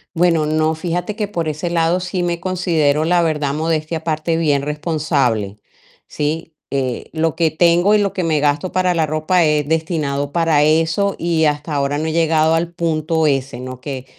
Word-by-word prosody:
Bueno, 165 -2 +2
no, 155 +1 +1
fíjate 175 +4 -3
que, 210 -2 -3
por 170 -6 -3
ese 155 +3 -3
lado 170 +1 +1
sí 180 0 -3
me 170 -1 -2
considero, 165 -5 +1
la 175 +1 +3
verdad, 150 -4 0
modestia 160 +1 -1
aparte 160 0 -1
bien 150 -4 +1
responsable, 145 - -1 0.5
¿sí? 155 +2 -3 0.2
Eh, 130 -3 -2
lo 160 -1 0
que 165 -2 +3
tengo 175 +5 +3
y - - +5
lo 200 -2 +1
que 185 - -2
me 155 -3 +1
gasto 145 +4 0
para 185 -1 +2
la 165 -2 +1
ropa 155 +3 +1
es 150 -1 +1
destinado 150 -4 -1
para 165 -3 +3
eso 165 +6 +2
y, 165 -2 +1
hasta 150 +1 -1
ahora 140 0 0
no 155 +2 -2
he - - -1
llegado 160 -1 +2
al 170 +1 -2
punto 160 -1 0
ese, 135 -4 -1
¿no?, 130 0 -7
que 130 -1 -6
160 Hz, 185 wpm, -18 LUFS, 150-170 Hz, 0.5 s, y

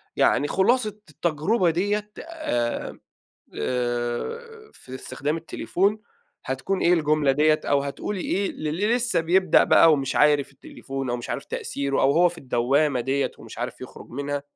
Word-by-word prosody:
يعني 145 - +3
خلاصة 215 +7 +2 0.2
التجربة 170 +5 0
ديّة 205 +5 -1
آآ 310 - -3 0.6
آآ 125 - -3
في 130 - -12
استخدام 140 +4 -3
التليفون، 190 +5 -1 0.5
هتكون 135 +9 -2
إيه 175 - +4
الجملة 155 -4 +2
ديّة 155 +2 +3
أو 140 -1 +2
هتقولي 160 +8 -4
إيه 195 +2 -1
للّي 175 +9 -1
لسه 245 -5 +1
بيبدأ 180 +1 +4
بقى 165 - +6
ومش 135 -3 -1
عارف 145 -2 +3
التليفون 135 -1 -6
أو 120 - 0
مش 120 - -7
عارف - - -3
تأثيره 140 -1 -2
أو 135 - +4
هو 175 +4 +5
في 170 0 -10
الدوامة 135 +1 +1
دِيَّة 135 +3 0
ومش - - -11
عارف - - -5
يخرج - - -11
منها؟ 140 +2 -3
150 Hz, 150 wpm, -24 LUFS, 135-190 Hz, 0.6 s, بقى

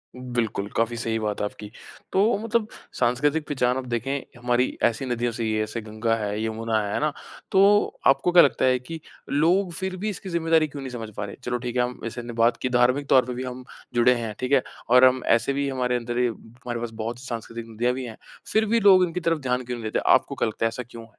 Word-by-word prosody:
बिल्कुल, 120 -5 -2
काफ़ी 115 +1 0
सही 115 -1 -1
बात 105 -1 -2
है - - +1
आपकी। 105 0 -7 0.4
तो 200 +2 +3
मतलब, 225 0 0 0.3
सांस्कृतिक 145 +6 +1
पहचान 125 -3 +1
आप 130 - -4
देखें 125 +2 -3
हमारी 125 +1 0
ऐसी 120 +3 +1
नदियों 120 -1 -1
से 115 0 -4
ही 110 -1 0
है। 110 0 +1
ऐसे 110 +2 -5
गंगा 110 +1 -1
है 105 -1 -3
यमुना 110 0 -1
है, 100 -1 -3
है - - 0
ना? 150 0 +1 0.4
तो 200 +2 +4
आपको 135 +6 +3
क्या 175 -1 +8
लगता 140 - +2
है 130 -1 +3
कि 160 +6 -8 0.3
लोग 175 +6 +2
फिर 190 +1 -2
भी 210 +4 -2
इसकी 195 -1 -6
ज़िम्मेदारी 165 -2 +2
क्यों 145 -1 -8
नहीं 130 -1 -6
समझ 115 -3 -6
पा 105 - -2
रहे? 100 - -8
चलो 125 0 -1
ठीक 120 0 -5
है 125 - +3
हम 125 0 -4
जैसे 115 +1 -5
हमने 120 0 -7
बात 115 +1 +3
की 130 - 0
धार्मिक 125 +3 +2
तौर 130 -2 +5
पर 125 - -4
भी 125 +1 -4
हम 125 0 -6 0.3
जुड़े 120 +1 +5
हैं, 115 -3 -4
ठीक 130 +1 -3
है? 135 -2 +4 0.3
और 125 +1 +7
हम 130 0 +3
ऐसे 120 +4 0
भी 140 +1 -1
हमारे 125 -2 0
अंदर 120 0 -2
ये 125 - +3
हमारे 120 +1 -7
पास 120 0 -4
बहुत 115 +2 -4
सांस्कृतिक 115 -2 -6
नदियाँ 120 +3 0
भी 130 0 -5
हैं। 115 -2 -9 0.3
फिर 220 0 +3
भी 230 +2 +2
लोग 195 -3 +6
इनकी 175 +1 -4
तरफ 165 -2 0
ध्यान 125 -2 -1
क्यों 125 0 -5
नहीं 115 - -8
देते, - - +1
आपको - - +3
क्या - - 0
लगता 110 +1 -2
है - - +5
ऐसा 115 +2 -5
क्यों? 115 -1 -10
125 Hz, 245 wpm, -24 LUFS, 115-140 Hz, 0.4 s, क्या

